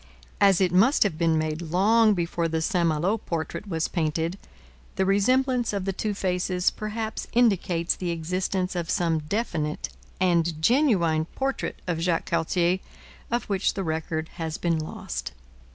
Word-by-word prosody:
As 195 -3 +5
it 185 -3 +2
must 215 - +5
have 200 -6 -1
been 165 -2 +3
made 155 +1 -1
long 205 +6 +3
before 170 -1 -1
the 160 0 -1
St 175 -2 +1
Malo 175 +8 0
portrait 170 +3 -4
was 165 -4 -1
painted, 165 +2 -1 0.6
the 190 - +1
resemblance 245 +5 +2
of 195 -2 -2
the 195 - -1
two 205 +2 -2
faces 180 -1 0
perhaps 215 +1 -4
indicates 190 -8 +2
the 180 - -4
existence 180 +3 -2
of 170 -2 -3
some 165 -2 +1
definite 155 -3 -2 0.3
and 170 -3 +2
genuine 170 - +3
portrait 270 0 -3
of 175 -3 -1
Jacques 170 -1 0
Cartier, 170 +2 +1 0.5
of 240 +1 0
which 195 -2 0
the 195 - -2
record 160 -1 -3
has 160 -1 -3
been 165 -2 0
lost. 155 - -5
180 Hz, 150 wpm, -26 LUFS, 165-200 Hz, 0.6 s, As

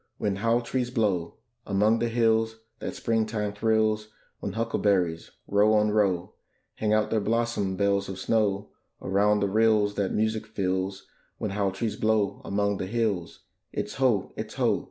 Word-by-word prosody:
when 100 -2 -1
haw 115 +3 +2
trees 120 +1 -2
blow 100 -9 0 0.3
Among 105 +3 +2
the 120 - +1
hills 115 -1 +2 0.2
that - - -5
Springtime 110 -2 -1
thrills; 110 0 +1 0.3
When 100 - -4
huckleberries, 100 -7 0 0.2
row 105 +2 +4
on 105 0 +3
row, 95 -4 +1 0.4
Hang 105 -1 0
out 110 0 +2
their 110 - +2
blossom 110 -3 0
bells 100 0 +1
of 95 - -5
snow 105 -1 0 0.3
Around 105 +2 +2
the 100 - +2
rills 105 0 +3
that 100 -2 0
music 110 0 0
fills: 95 -2 -2 0.3
When 105 - -3
haw 100 -1 0
trees 105 +2 -3
blow 110 -2 +1
among 100 0 0
the 95 - -4
hills, 105 -6 -2 0.3
It's - - -4
ho, 120 -7 +2
it's - - -6
ho! - - +2
105 Hz, 155 wpm, -27 LUFS, 100-110 Hz, 0.4 s, row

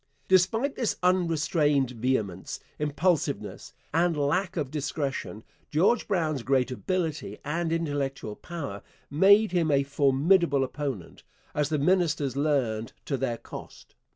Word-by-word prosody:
Despite 225 +9 +3
this 235 -5 -1
unrestrained 160 -6 +2
vehemence, 110 -7 -2 0.2
impulsiveness, 150 +3 -1 0.2
and 170 -1 +2
lack 175 +7 0
of 145 -4 -2
discretion, 140 -6 -3 0.3
George 185 +10 +2
Brown's 160 - 0
great 130 0 +1
ability 165 +3 -2
and 165 +3 -1
intellectual 145 -8 -2
power 140 - -6 0.3
made 200 +7 +5
him 170 -3 +1
a 140 -1 +3
formidable 140 +2 +3
opponent, 130 - -5 0.3
as 150 0 0
the 155 - +1
ministers 150 -4 +1
learned 130 -7 0
to 140 - -1
their 130 -3 -2
cost. - - -11
150 Hz, 120 wpm, -27 LUFS, 135-175 Hz, 0.3 s, made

